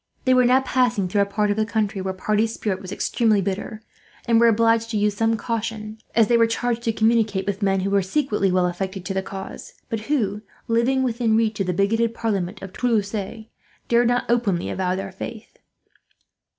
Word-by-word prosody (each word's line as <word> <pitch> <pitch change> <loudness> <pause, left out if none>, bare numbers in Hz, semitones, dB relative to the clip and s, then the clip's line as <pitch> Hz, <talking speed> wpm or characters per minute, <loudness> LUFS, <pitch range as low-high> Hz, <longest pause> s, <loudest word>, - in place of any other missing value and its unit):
They 255 - +4
were 255 -1 +5
now 255 +2 +5
passing 245 -7 +1
through 200 +3 +1
a 200 - +1
part 210 +1 0
of 205 - -1
the 220 - +2
country 215 -3 -1
where 190 0 -2
party 210 +4 0
spirit 210 -4 -3
was 185 -1 -8
extremely 220 0 +1
bitter, 200 +3 -4 0.4
and 230 -1 +4
were 235 - +6
obliged 230 0 +3
to 220 - -1
use 210 0 +1
some 225 +1 +1
caution, 220 -1 -4 0.2
as 225 -2 +5
they 235 - +4
were 230 0 +4
charged 235 +1 -1
to 225 - +2
communicate 220 -3 +1
with 200 0 -3
men 195 -1 +2
who 195 +1 -1
were 200 0 +3
secretly 210 -2 0
well 180 0 +2
affected 190 +1 -4
to 195 - -3
the 190 - 0
cause; 190 0 -8 0.2
but 225 - -2
who, 210 -8 0 0.3
living 240 +3 +2
within 230 -3 +1
reach 220 -2 0
of 195 - 0
the - - +1
bigoted 225 +5 +1
parliament 195 -4 -2
of 190 -1 -8
Toulouse, 220 -5 0
dared 225 +3 -2
not 245 +1 +1
openly 220 -7 0
avow 185 -1 -1
their 195 0 -5
faith. 220 +4 -9
215 Hz, 205 wpm, -23 LUFS, 195-230 Hz, 0.4 s, were